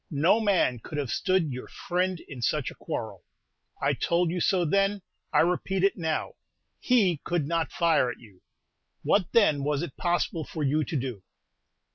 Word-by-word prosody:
No 165 +8 +3
man 190 - +2
could 150 - -7
have 140 -5 -2
stood 185 -1 +1
your 125 0 -6
friend 180 0 -2
in 135 -4 -10
such - - 0
a - - -10
quarrel. - - -6 0.6
I - - +1
told 170 0 +1
you 180 0 -2
so 180 0 +2
then, 195 +3 +1 0.3
I - - +4
repeat 180 +2 0
it 195 - +3
now, 160 -3 -2 0.5
he 205 -10 +3
could 170 -5 -1
not 165 -1 -1
fire 165 -7 +2
at 120 - -6
you; 100 -6 -18 0.6
what, 195 -4 +2
then, 155 -11 +4
was 145 +1 0
it 160 -6 -7
possible 175 -2 0
for 155 +1 -5
you 150 +3 +2
to - - -5
do?" 125 -6 -4
165 Hz, 175 wpm, -27 LUFS, 145-185 Hz, 0.6 s, I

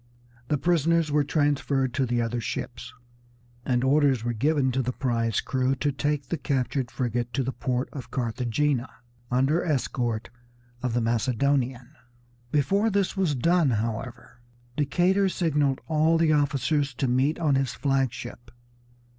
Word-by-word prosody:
The 150 - +1
prisoners 165 0 +2
were 150 0 +3
transferred 140 -3 0
to 130 0 0
the 120 0 +1
other 115 +1 -2
ships, 125 +2 -5 0.7
and 125 -1 0
orders 135 -3 +3
were 120 0 -1
given 135 +3 +1
to 130 +2 0
the 125 0 -1
prize 115 -3 0
crew 130 0 0
to 145 +2 0
take 145 -1 -2
the 170 - -2
captured 130 -2 -1
frigate 120 -1 -2
to 135 - +1
the 130 - -2
port 125 0 -2
of 135 -4 -7
Carthagena, 125 +2 -1 0.4
under 135 +7 +2
escort 120 -7 -1 0.5
of 125 -2 -1
the 120 - +2
Macedonian. 125 +2 0 0.6
Before 195 +10 +2
this 200 -2 0
was 185 -7 +1
done, 170 +3 +3
however, 115 +2 -4 0.3
Decatur 180 +7 +2
signaled 150 -7 0
all 160 +1 +3
the 160 -1 +3
officers 145 -1 +1
to 135 +2 -1
meet 130 +5 +1
on 155 -4 +1
his 135 -3 0
flag 135 -2 +1
ship. 120 0 -9
135 Hz, 145 wpm, -26 LUFS, 120-150 Hz, 0.7 s, were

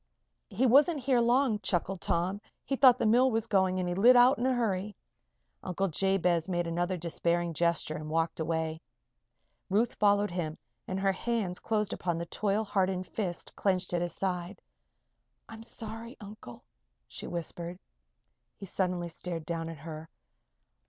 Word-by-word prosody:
"He 250 +6 +1
wasn't 285 +6 +5
here 255 -1 +2
long," 240 -2 +3
chuckled 190 -1 -1
Tom. 185 +4 -1 0.2
"He 275 - -1
thought 255 -2 +7
the - - -1
mill 245 +4 +5
was 225 -2 0
going 190 -4 +2
and 180 -1 -1
he 175 - -1
lit 235 +8 +6
out 245 +1 +6
in 250 - +1
a 260 - +2
hurry." 210 -3 -1 0.7
Uncle 195 +1 -1
Jabez 180 -1 +1
made 175 -1 0
another 175 +2 -1
despairing 170 0 -1
gesture 170 -1 0
and 155 0 -7
walked 165 +1 0
away. 160 0 -2 0.9
Ruth 215 +5 +2
followed 205 -1 +3
him 165 -3 -3 0.3
and 185 - -2
her 195 0 +2
hands 195 -2 -2
closed 215 -2 -1
upon 175 -2 -2
the 170 - -3
toil 205 +5 0
hardened 190 -3 0
fist 185 -5 -5
clenched 185 -2 0
at 175 - +1
his 175 0 -2
side. 185 0 -3 0.9
"I'm 225 0 -10
sorry, 225 +1 -8
Uncle," 205 - -11 0.4
she - - -8
whispered. 170 +1 -4 0.8
He 195 - -8
suddenly 180 -2 -1
stared 170 -1 -6
down 165 0 -3
at 165 - -7
her. 160 +2 -8
185 Hz, 160 wpm, -30 LUFS, 170-215 Hz, 0.9 s, thought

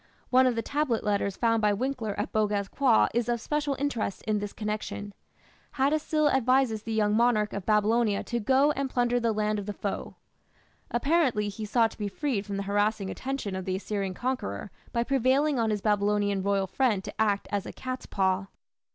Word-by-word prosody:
One 260 0 +6
of 250 - +1
the 230 - -1
tablet 285 -6 0
letters 200 -1 0
found 230 -1 +2
by 210 -1 +3
Winckler 230 -2 -2
at 205 - -2
Boghaz 205 -2 0
Köi 260 -5 +4
is 240 +1 0
of 240 -1 +1
special 295 +2 -1
interest 260 -8 -2
in 215 -1 0
this 205 0 -4
connection. 210 -1 -4 0.6
Hattusil 300 +2 +2
advises 255 -3 +2
the 225 - -6
young 210 -1 +2
monarch 220 -3 +2
of 200 -2 -5
Babylonia 215 0 +2
to 235 - -2
"go 265 +6 +3
and 275 -2 -2
plunder 245 -1 +1
the 230 -1 +1
land 215 0 0
of 200 - -7
the 205 - -3
foe". 200 0 -4 0.7
Apparently 250 -5 +1
he 215 +2 -6
sought 225 +1 +2
to - - -15
be 205 - -1
freed 215 -2 -2
from 200 -1 -3
the 200 - -2
harassing 205 0 0
attention 260 -7 -4
of 190 -1 -4
the 185 - -1
Assyrian 195 -1 -3
conqueror 205 - -3 0.2
by 235 - +1
prevailing 270 +2 +2
on 225 -1 +1
his 210 -2 -1
Babylonian 205 -1 +1
royal 200 0 +1
friend 210 0 +1
to - - -5
act 205 -2 +1
as 200 -2 -2
a - - -5
"cat's 255 0 -6
paw". 190 0 0
220 Hz, 195 wpm, -28 LUFS, 205-255 Hz, 0.7 s, One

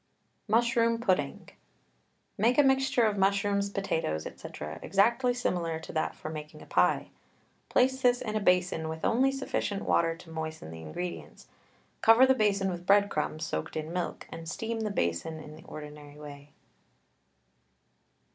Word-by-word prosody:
MUSHROOM 230 +1 +3
PUDDING. 185 - -1 0.9
Make 235 +5 +2
a 290 - +7
mixture 265 -2 +3
of 210 -2 +1
mushrooms, 200 +1 +2
potatoes, 160 - -2
&c., - - -8 0.3
exactly 235 +6 +3
similar 175 -9 -1
to 160 - -10
that 155 - -1
for 155 - -7
making 155 0 -8
a - - -13
pie. - - +2 0.6
Place 260 +1 +2
this 245 -1 +4
in 215 -3 -4
a - - +2
basin 180 -4 +2
with 160 0 -4
only 260 +4 +3
sufficient 265 -7 -2
water 165 -1 +2
to 165 0 -14
moisten 160 - -5
the 80 0 -9
ingredients, 175 - -7 0.5
cover 225 +3 +7
the 265 - +5
basin 200 -5 +1
with 175 0 -7
bread 200 0 +5
crumbs 155 +1 -2
soaked 80 - -4
in 155 +2 -4
milk, 180 -1 -3
and 165 0 -7
steam 225 +4 -3
the 220 -1 -1
basin 160 - -1
in 155 0 -10
the 160 +2 -15
ordinary 150 -1 -10
way. 145 -1 -11
190 Hz, 155 wpm, -29 LUFS, 155-225 Hz, 0.9 s, a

